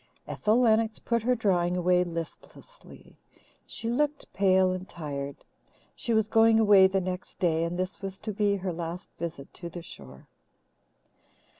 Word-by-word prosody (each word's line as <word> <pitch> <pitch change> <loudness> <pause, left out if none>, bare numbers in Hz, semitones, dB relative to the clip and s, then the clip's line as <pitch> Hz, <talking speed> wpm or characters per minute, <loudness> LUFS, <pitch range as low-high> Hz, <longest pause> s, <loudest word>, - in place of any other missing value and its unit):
Ethel 215 +3 +1
Lennox 220 -2 +3
put 235 -1 -1
her 250 +3 +2
drawing 180 -5 +1
away 180 0 +3
listlessly. 170 - -10 0.5
She 225 - -6
looked 290 +5 -1
pale 190 -1 +3
and 185 +1 -5
tired. 140 -4 -6 0.5
She 235 - -4
was 220 -1 +2
going 225 0 +5
away 205 -3 +7
the 195 0 0
next 185 0 -5
day, 165 -3 +1
and 170 +1 -3
this 185 +1 -4
was 195 -1 -5
to 215 -1 -3
be 205 0 +1
her 190 -2 -3
last 170 +2 -6
visit 160 -5 -6
to 170 - -7
the 170 0 -8
shore. 65 - -12
190 Hz, 155 wpm, -28 LUFS, 175-220 Hz, 0.5 s, away